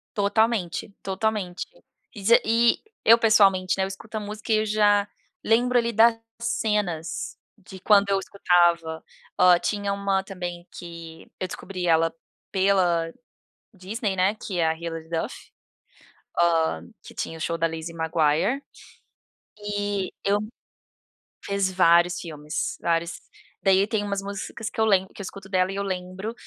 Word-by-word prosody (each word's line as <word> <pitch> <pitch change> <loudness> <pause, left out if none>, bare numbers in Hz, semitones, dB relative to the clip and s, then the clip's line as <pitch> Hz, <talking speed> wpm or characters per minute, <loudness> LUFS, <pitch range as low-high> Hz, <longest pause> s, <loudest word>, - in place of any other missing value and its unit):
Totalmente, 205 -2 0
totalmente. 195 -2 -2 0.5
E 205 -4 -9
z 230 +4 +6
e, 230 +1 +3 0.2
eu 230 +1 +8
pessoalmente, 195 -5 +4
né, 190 - +1
eu - - 0
escuto 210 +3 -7
a - - -1
música, 210 +2 -6
e 215 - +5
eu 215 - +1
já, 205 -1 +3 0.4
lembro 245 +2 +3
ali, 235 -1 +1
das 225 +1 +5 0.2
cenas 210 -8 -2 0.2
de 190 -1 -12
quando 200 0 +4
eu 195 -1 +2
escutava. 170 -4 +2 0.4
Hã, 180 -1 +7
tinha 205 -1 -1
uma 200 -1 0
também, 175 -2 -6
que 165 -2 -10
eu 185 - -2
descobri 180 -1 -5
ela, 165 0 +3 0.4
pela 180 -4 +2 0.6
Disney, 200 +2 -3
né, 190 +3 +2
que 195 -4 -5
é 165 - +3
a 160 - 0
Hillard 165 -1 -6
Duff, 165 -1 -2 1.0
hã, 160 - +1
que - - -13
tinha 165 - -4
o - - -10
show 165 0 -1
da 165 - +2
Lizzy 165 +1 -6
Maguire, 160 - +1 1.0
e 205 -2 -2
eu 200 +1 +3 1.1
fiz 200 -1 0
vários 175 -1 +4
filmes, 150 -3 -4
vários. 170 0 -1 0.4
Daí 195 +1 +4
tem 215 -2 -1
umas 200 -1 -2
músicas, 200 +3 -5
que - - -9
eu 220 - +4
lembro 190 -3 +2
que - - -9
eu - - -5
escuto 190 +1 -9
dela 185 -1 +2
e - - -5
eu 200 - -2
lembro 190 +3 -4
190 Hz, 150 wpm, -25 LUFS, 170-210 Hz, 1.1 s, eu